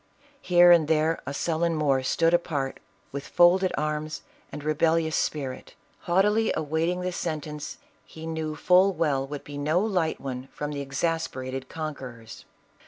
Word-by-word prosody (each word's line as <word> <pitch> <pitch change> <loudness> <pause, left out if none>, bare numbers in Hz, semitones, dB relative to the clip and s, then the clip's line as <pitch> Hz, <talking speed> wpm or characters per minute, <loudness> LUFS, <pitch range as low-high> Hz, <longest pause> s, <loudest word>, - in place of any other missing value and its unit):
Here 175 -1 +6
and 165 -3 +5
there 160 +1 +1
a - - -2
sullen 165 +2 0
Moor 140 -4 +2
stood 165 +5 +2
apart 145 -6 -1 0.3
with 140 +1 -6
folded 185 +2 +4
arms 155 0 -3 0.3
arid 150 - -7
rebellious 160 +1 +1
spirit, 135 -4 -3 0.2
haughtily 210 +4 +2
awaiting 160 +4 -1
the 180 0 -2
sentence 150 -3 -5 0.3
he 160 0 -11
knew 160 -1 -3
full 185 +4 +4
well 140 -6 0
would 145 0 -6
be 145 -1 -7
no 155 +4 +2
light 185 -6 0
one 130 -1 -6
from 150 0 -4
the 145 -1 -4
exasper 140 -1 -2
ated 130 0 -5
conquerors. 130 -8 -7
155 Hz, 150 wpm, -26 LUFS, 145-170 Hz, 0.3 s, Here